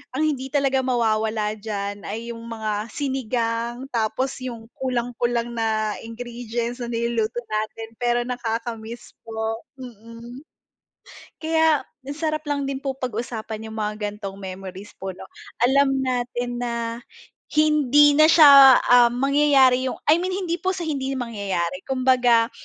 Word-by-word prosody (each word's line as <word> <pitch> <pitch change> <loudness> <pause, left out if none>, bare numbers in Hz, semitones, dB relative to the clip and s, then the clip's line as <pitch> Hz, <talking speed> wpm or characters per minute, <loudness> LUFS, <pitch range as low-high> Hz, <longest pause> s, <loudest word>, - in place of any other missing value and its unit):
ang 310 - +1
hindi 275 -4 -1
talaga 275 -1 +1
mawawala 220 -4 0
diyan 205 -1 -5
ay 230 +2 -5
'yung 230 - -8
mga 220 -1 -3
sinigang, 240 -2 -2
tapos 240 +4 -1
'yung 235 -3 -8
kulang-kulang 240 -2 -1
na 220 -2 -1
ingredients 235 +1 -5
na 240 - -4
niluluto 235 0 -1
natin 215 +1 -3
pero 240 0 +1
nakaka-miss 235 -1 -5 0.2
po, 225 0 -4
mm. 240 +2 -11 0.9
Kaya 320 -2 +2 0.2
ang 280 +3 -7
sarap 310 -1 -1
lang 285 -1 -1
din 275 0 -4
po 270 -1 -3
pag-usapan 225 -3 -5
'yung 220 - -7
mga 210 0 -2 0.2
ganitong 205 -2 -7
memories 190 +1 -8
po, 190 -1 -5
'no. 185 - -12 0.5
Alam 270 -1 +3
natin 245 -1 -2
na 235 -1 -3 0.6
hindi 295 -1 +4
na 310 - +8
siya, 315 -2 +8 0.3
um, 240 -1 +5
mangyayari 275 -2 +4
'yung - - -2 0.2
I 320 - +6
mean 370 +1 -2
hindi 355 -3 -2
po 375 +1 -1
sa 360 - -5
hindi 275 -4 -2
mangyayari, 195 -8 -3
kumbaga 250 -3 +3
240 Hz, 135 wpm, -23 LUFS, 225-270 Hz, 0.9 s, na